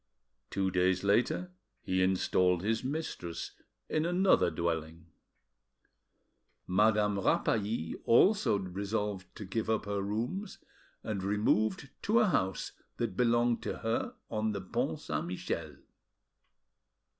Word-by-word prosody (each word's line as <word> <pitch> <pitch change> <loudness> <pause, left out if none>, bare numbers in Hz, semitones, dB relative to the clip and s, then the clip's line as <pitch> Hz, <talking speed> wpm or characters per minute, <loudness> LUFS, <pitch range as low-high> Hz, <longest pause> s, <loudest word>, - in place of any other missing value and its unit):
Two 95 -1 0
days 90 +1 +2
later 100 -3 +1 0.3
he 95 0 0
installed 90 -1 +2
his 110 +3 0
mistress 130 - -4 0.4
in 155 - 0
another 180 - +3
dwelling.... 80 0 -3 1.6
Madame 105 +1 +3
Rapally 100 -3 0
also 195 - +5
resolved 100 +1 -3
to 105 - -7
give 110 +4 -2
up 110 -2 +1
her 100 -1 -1
rooms, 115 - -3 0.5
and 105 -3 -3
removed 105 +6 +1
to 220 +3 +2
a 220 - +5
house 95 - 0 0.3
that 115 -6 -2
belonged 120 +1 +2
to - - -4
her, 120 - -2 0.2
on 110 0 0
the 100 - -3
Pont 90 - -2
Saint - - -3
Michel. 90 +1 -4
105 Hz, 115 wpm, -31 LUFS, 95-115 Hz, 1.6 s, also